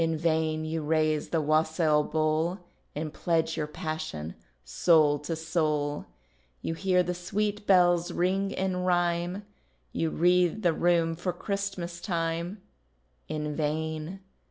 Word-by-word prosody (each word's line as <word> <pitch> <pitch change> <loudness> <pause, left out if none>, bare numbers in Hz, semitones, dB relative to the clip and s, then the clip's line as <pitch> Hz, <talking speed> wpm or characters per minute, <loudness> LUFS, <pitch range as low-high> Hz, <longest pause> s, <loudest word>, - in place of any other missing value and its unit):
In 165 -1 +1
vain 160 -1 0
you 160 0 -2
raise 155 0 +1
the 165 - +1
wassail 155 0 +2
bowl, 155 +3 0 0.4
And 155 0 -4
pledge 165 -1 0
your 150 - -2
passion, 155 - -5 0.3
soul 145 - +4
to 160 +3 -3
soul. 155 -3 -1 0.6
You - - -1
hear 180 +1 +2
the 180 - -2
sweet 205 +4 -2
bells 175 -2 +4
ring 190 +3 +1
in 190 -1 -1
rhyme, 175 +1 0 0.5
You 165 - 0
wreath 180 +4 +2
the 170 - +4
room 170 -1 +2
for 175 +2 -2
Christmas 180 -2 -4
time 170 +1 -2 0.6
In 150 -1 -3
vain. 160 +4 -2
165 Hz, 130 wpm, -28 LUFS, 155-180 Hz, 0.6 s, soul